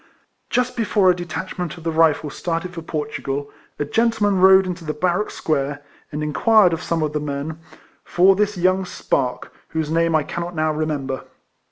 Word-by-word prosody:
Just 250 0 0
before 205 -5 +3
a - - 0
detach 175 +1 -6
ment 175 -1 -3
of 165 - -12
the 165 - -1
Rifles 160 -2 +2
started 175 +1 -3
for 165 - -6
Portugal, 145 -3 -4 0.3
a 145 - -1
gentleman 210 +1 +1
rode 190 0 +7
into 180 -1 -5
the 155 -1 -4
barrack 180 +5 0
square, 145 -2 -2 0.3
and 150 0 -3
inquired 180 +5 +4
of 165 - -3
some 165 -2 -1
of 150 -1 -2
the 150 - 0
men 150 +2 -4 0.4
for 190 +2 +4
this 210 0 0
young 185 +2 +2
spark, 130 -7 -2
whose 160 -1 -3
name 165 0 +2
I 155 - +3
cannot 175 +3 -5
now 155 -1 +1
remember. 145 -4 -3
165 Hz, 180 wpm, -21 LUFS, 150-185 Hz, 0.4 s, rode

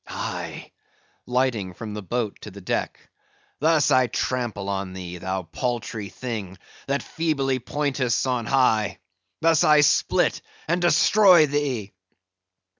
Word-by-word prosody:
Aye," - - -6 0.6
lighting 125 -7 0
from 105 +1 -7
the 105 - -5
boat 110 +1 -3
to - - -8
the 100 0 -11
deck, 90 - -4 0.5
"thus 155 0 +3
I 130 -1 +4
trample 120 -4 -2
on 95 -1 -3
thee, 90 -1 -7
thou 95 +1 -3
paltry 110 +3 -4
thing 100 -3 -6 0.3
that 140 +1 -1
feebly 140 -5 -1
pointest 135 -2 -1
on 125 -3 -1
high; 110 -6 +2 0.4
thus 165 -1 +4
I 150 -1 +6
split 150 -1 +2 0.3
and 175 +2 0
destroy 175 +1 +6
thee!" 135 -8 -2
125 Hz, 125 wpm, -24 LUFS, 100-145 Hz, 0.6 s, I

